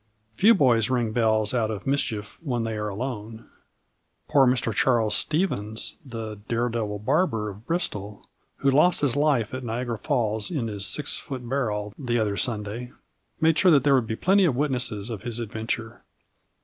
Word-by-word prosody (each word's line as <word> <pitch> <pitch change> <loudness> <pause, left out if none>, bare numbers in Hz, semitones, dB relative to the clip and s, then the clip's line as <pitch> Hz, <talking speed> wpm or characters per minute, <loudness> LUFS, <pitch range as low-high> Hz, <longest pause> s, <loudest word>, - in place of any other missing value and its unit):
Few 220 - +5
boys 120 - +3
ring 120 -3 +1
bells 110 -1 +2
out 115 -3 +1
of 105 -3 -5
mischief 115 -7 -2
when 125 -7 -2
they 110 -1 -3
are 105 0 -2
alone. 110 0 -6 0.8
Poor 135 -2 +5
Mr 125 -3 +1
Charles 115 0 +2
Stephens, 110 - -1
the 110 -5 -6
"Daredevil 115 -3 -1
Barber" 115 - +1
of 105 +3 -12
Bristol, 105 - -3 0.3
who 140 - +2
lost 155 +6 +4
his 140 -4 +1
life 145 -7 +2
at 130 0 -4
Niagara 120 -1 -3
Falls 110 -7 0
in 135 -10 -2
his 100 -2 -4
six 150 - -2
foot 130 -3 -7
barrel 105 -6 -2
the 120 -4 0
other 105 -3 0
Sunday, 110 +2 -3 0.5
made 160 0 +3
sure 185 - +5
that 145 -6 +5
there 145 - +4
would 125 -4 +3
be 110 - -2
plenty 195 - +3
of 145 -8 +2
witnesses 125 -6 -1
of 110 - -5
his 120 -2 -4
adventure. 115 0 -4
120 Hz, 170 wpm, -25 LUFS, 110-135 Hz, 0.8 s, Few